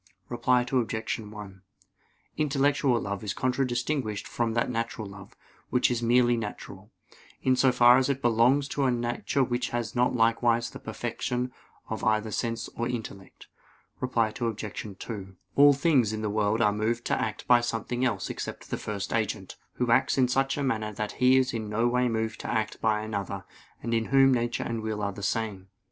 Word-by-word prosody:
Reply 125 Hz, 0 st, +2 dB
Obj. 115 Hz, -3 st, -1 dB
1: 105 Hz, -3 st, -10 dB, 0.7 s
Intellectual 140 Hz, -3 st, +2 dB
love 100 Hz, -2 st, -4 dB
is 105 Hz, -, -3 dB
contradistinguished 125 Hz, -3 st, -1 dB
from 115 Hz, -1 st, -1 dB
that 115 Hz, -, +1 dB
natural 115 Hz, -2 st, -3 dB
love, 100 Hz, -1 st, -12 dB, 0.3 s
which 125 Hz, -, +2 dB
is 120 Hz, -1 st, -1 dB
merely 120 Hz, +1 st, +4 dB
natural, 105 Hz, -2 st, -7 dB, 0.5 s
in 130 Hz, -1 st, +4 dB
so 130 Hz, 0 st, +4 dB
far 125 Hz, 0 st, +6 dB
as 130 Hz, -, 0 dB
it 135 Hz, -1 st, 0 dB
belongs 120 Hz, +3 st, +3 dB
to 140 Hz, 0 st, 0 dB
a -, -, +3 dB
nature 120 Hz, +3 st, 0 dB
which 125 Hz, +1 st, -1 dB
has 120 Hz, -1 st, -3 dB
not 125 Hz, +1 st, +2 dB
likewise 115 Hz, 0 st, +2 dB
the -, -, -9 dB
perfection 125 Hz, 0 st, -3 dB, 0.4 s
of -, -, -5 dB
either 110 Hz, 0 st, +1 dB
sense 115 Hz, +1 st, -2 dB
or 120 Hz, -, -3 dB
intellect. 110 Hz, -6 st, -7 dB, 0.5 s
Reply 115 Hz, -4 st, 0 dB
Obj. 110 Hz, -3 st, -4 dB
2: 95 Hz, -4 st, -7 dB, 0.2 s
All 145 Hz, 0 st, +7 dB
things 135 Hz, -7 st, +2 dB
in 110 Hz, 0 st, -4 dB
the 105 Hz, -, -1 dB
world 105 Hz, +1 st, +1 dB
are 105 Hz, -2 st, +3 dB
moved 115 Hz, +3 st, -1 dB
to -, -, 0 dB
act 110 Hz, -, -3 dB
by 120 Hz, -1 st, +6 dB
something 120 Hz, +1 st, -2 dB
else 110 Hz, -7 st, 0 dB
except -, -, -7 dB
the -, -, -1 dB
First 100 Hz, -2 st, -4 dB
Agent, 110 Hz, -4 st, -2 dB, 0.2 s
Who 125 Hz, -2 st, 0 dB
acts 115 Hz, -, +3 dB
in 130 Hz, -2 st, +4 dB
such 135 Hz, +2 st, +1 dB
a 145 Hz, -, -1 dB
manner 110 Hz, -5 st, -1 dB
that 105 Hz, +1 st, -3 dB
He 130 Hz, +1 st, +6 dB
is 130 Hz, 0 st, +1 dB
in 110 Hz, -2 st, -3 dB
no 115 Hz, +3 st, +1 dB
way 125 Hz, 0 st, +2 dB
moved 110 Hz, -1 st, -2 dB
to -, -, -5 dB
act 110 Hz, -2 st, -2 dB
by 110 Hz, -1 st, +2 dB
another; 100 Hz, -2 st, -4 dB, 0.4 s
and 115 Hz, -, -2 dB
in 115 Hz, -1 st, +1 dB
Whom 135 Hz, +1 st, +5 dB
nature 120 Hz, -1 st, 0 dB
and 115 Hz, -1 st, -3 dB
will 110 Hz, -1 st, -3 dB
are 100 Hz, -, 0 dB
the 100 Hz, -, -9 dB
same. 100 Hz, -2 st, -2 dB
115 Hz, 185 wpm, -27 LUFS, 110-125 Hz, 0.7 s, All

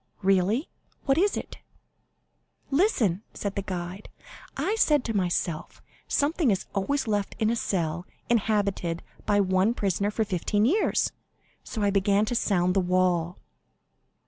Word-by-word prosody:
"Really? 195 Hz, -, +2 dB, 0.4 s
What 275 Hz, +2 st, +3 dB
is 405 Hz, +2 st, +2 dB
it?" -, -, -7 dB, 1.1 s
"Listen," 260 Hz, -, +2 dB
said 200 Hz, -1 st, -3 dB
the 200 Hz, -, -2 dB
guide; 185 Hz, +1 st, -6 dB, 0.5 s
"I 415 Hz, -, 0 dB
said 300 Hz, -, +3 dB
to 225 Hz, -, -2 dB
myself, 175 Hz, -4 st, -1 dB, 0.3 s
'Something 295 Hz, 0 st, +1 dB
is 195 Hz, -3 st, 0 dB
always 250 Hz, +7 st, 0 dB
left 205 Hz, -2 st, -1 dB
in 220 Hz, -1 st, +1 dB
a -, -, +1 dB
cell 175 Hz, -5 st, -2 dB, 0.2 s
inhabited 200 Hz, -6 st, 0 dB, 0.2 s
by 205 Hz, 0 st, +3 dB
one 190 Hz, +4 st, +2 dB
prisoner 200 Hz, -1 st, 0 dB
for 220 Hz, +1 st, -1 dB
fifteen 205 Hz, +2 st, 0 dB
years,' 380 Hz, -, +2 dB, 0.5 s
so 220 Hz, -, -4 dB
I 200 Hz, -, +3 dB
began 200 Hz, +1 st, +3 dB
to 230 Hz, -, -2 dB
sound 180 Hz, -5 st, +2 dB
the 195 Hz, -, +3 dB
wall." 180 Hz, -1 st, +1 dB
200 Hz, 140 wpm, -26 LUFS, 185-230 Hz, 1.1 s, What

